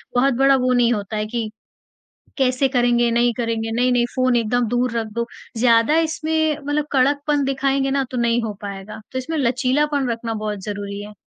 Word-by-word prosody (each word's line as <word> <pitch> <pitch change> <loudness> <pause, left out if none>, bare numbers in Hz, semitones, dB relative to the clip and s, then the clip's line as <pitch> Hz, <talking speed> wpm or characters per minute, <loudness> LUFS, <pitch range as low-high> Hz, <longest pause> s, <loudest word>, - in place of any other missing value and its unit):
बहुत 265 +2 +3
बड़ा 275 0 +5
वो 255 -1 +1
नहीं 240 -1 +3
होता 210 0 -4
है 210 - -1
कि, 225 -1 -3 0.9
कैसे 260 0 +2
करेंगे, 240 -2 +2
नहीं 240 +1 +2
करेंगे, 225 -2 -2
नहीं-नहीं 245 +1 +2
फ़ोन 255 -1 +2
एकदम 240 +1 +1
दूर 245 +1 0
रख 225 -1 -2
दो। 235 0 -1 0.3
ज़्यादा 230 +5 +4
इसमें 315 -1 0
मतलब 290 +1 -1
कड़कपन 285 +2 +2
दिखाएँगे 270 0 0
ना 275 0 +1
तो 255 - -4
नहीं 235 0 +2
हो 220 -2 -3
पाएगा। 200 0 -7
तो 260 - -4
इसमें 315 +5 -4
लचीलापन 265 +2 +1
रखना 230 0 -3
बहुत 210 -1 -4
ज़रूरी 200 0 -5
है। 210 0 -10
245 Hz, 180 wpm, -21 LUFS, 230-275 Hz, 0.9 s, बड़ा